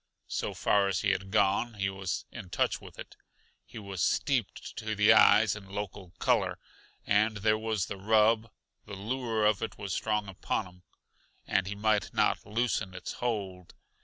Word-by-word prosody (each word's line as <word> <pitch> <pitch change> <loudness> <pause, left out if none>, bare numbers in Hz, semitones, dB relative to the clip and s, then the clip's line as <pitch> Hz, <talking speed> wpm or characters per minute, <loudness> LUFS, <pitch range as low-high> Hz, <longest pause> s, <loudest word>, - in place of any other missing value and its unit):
So - - -2
far 100 -1 +2
as 95 -3 0
he 100 - +2
had 95 +1 -2
gone, 105 +3 +2
he 100 -1 -1
was 95 -1 -3
in 95 - -9
touch - - 0
with - - -13
it; - - -10 0.5
he - - -11
was 100 -4 -5
steeped 125 - 0
to 110 -2 -3
the 105 0 +6
eyes - - +6
in 100 -2 -11
local 100 -2 -6
color - - +1 0.5
and 105 +1 +2
there 110 +1 +2
was 110 -3 -1
the 100 - -6
rub 110 +2 +3 0.4
The 100 - -7
lure 110 +1 -1
of 105 0 +3
it 115 - -4
was 95 -2 -4
strong 105 -2 -1
upon 95 +2 -2
him, 90 0 -16 0.6
and 95 -1 +1
he 100 - -4
might 105 0 +1
not - - +1
loosen 110 -3 -1
its 90 - -6
hold. 100 -7 -3
105 Hz, 175 wpm, -30 LUFS, 95-110 Hz, 0.6 s, the